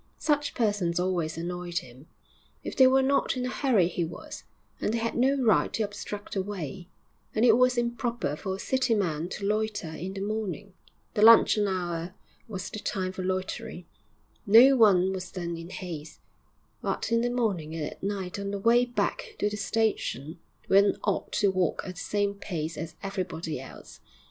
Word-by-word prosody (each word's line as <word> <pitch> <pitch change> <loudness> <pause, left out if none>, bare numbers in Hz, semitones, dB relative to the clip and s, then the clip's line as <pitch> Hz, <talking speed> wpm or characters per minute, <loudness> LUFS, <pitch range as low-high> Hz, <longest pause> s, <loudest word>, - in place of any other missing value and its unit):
Such 295 -1 0
persons 205 -7 +1
always 175 -3 -1
annoyed 175 0 -4
him; 130 -3 -7 0.6
if - - -5
they 260 - +7
were 265 +1 +4
not 275 0 +1
in 250 - -1
a 250 - -2
hurry 235 -13 +3
he 175 0 -2
was, 165 - -8 0.3
and - - 0
they 230 - 0
had 230 0 -1
no 265 +3 +3
right 230 -4 +3
to 225 - 0
obstruct 205 0 -6
the 195 - 0
way; 185 -3 -6 0.5
and 220 +2 +3
it 225 -2 +7
was 250 0 +3
improper 235 - -1
for 190 +4 -4
a - - -9
city 260 -1 +1
man 170 -5 -1
to 200 - -5
loiter 210 -4 -1
in 185 +4 -6
the 195 - -4
morning 205 -2 -4 0.4
the 210 - 0
luncheon 220 -2 +7
hour 175 -1 -3 0.3
was 195 -4 -5
the 215 - -5
time 190 -2 -2
for 185 0 -6
loitering, 185 +1 -3 0.6
no 240 +6 +8
one 190 -5 +5
was 185 -1 -5
then 170 -2 -4
in 165 +1 -8
haste; 165 -5 -7 0.6
but - - -2
in 230 0 +3
the 245 - +1
morning 200 -11 -1
and 155 -2 -2
at - - -8
night 195 -1 -3
on 200 0 -3
the 200 - -2
way 235 +4 +4
back 335 - -2
to 210 - 0
the - - -3
station, 195 - -1 0.3
one 200 +1 +4
ought 200 - -1
to 200 -2 +3
walk 185 -3 0
at 185 - -5
the 180 - -8
same 205 -1 0
pace 165 -5 -4
as 160 +1 -6
everybody 185 -6 -4
else. 135 - -12
200 Hz, 185 wpm, -28 LUFS, 175-225 Hz, 0.6 s, no